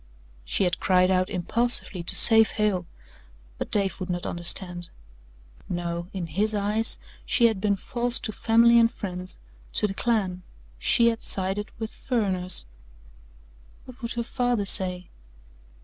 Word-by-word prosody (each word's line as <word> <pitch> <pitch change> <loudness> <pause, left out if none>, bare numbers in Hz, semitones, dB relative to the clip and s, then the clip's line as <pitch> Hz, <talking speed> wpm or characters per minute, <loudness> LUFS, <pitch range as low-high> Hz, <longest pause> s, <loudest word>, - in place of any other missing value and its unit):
She - - -1
had 180 -2 0
cried 185 -1 +3
out 185 +1 +1
impulsively 210 +1 +3
to 170 - +2
save 225 -1 +7
Hale, 200 -5 0 0.7
but - - -4
Dave 195 -3 -1
would 185 0 -6
not 175 -1 -3
understand. 175 0 -3 0.8
No, 170 -1 -4
in 185 -3 -5
his 205 +7 0
eyes 210 +2 +1 0.3
she 235 - +2
had 220 -4 +1
been 205 -1 +1
false 240 +5 -1
to 215 - -4
family 235 +2 +4
and 230 0 +4
friends 185 -2 -7 0.4
to - - 0
the 200 - -2
clan 195 -5 -1 0.4
she 235 -1 +3
had 225 -1 -4
sided 195 +2 -2
with 220 -1 -5
"furriners." 190 - -1 1.2
What 255 +1 -14
would 235 0 -4
her 235 - -3
father 245 -3 -1
say? 180 -2 -2
200 Hz, 145 wpm, -25 LUFS, 180-230 Hz, 1.2 s, save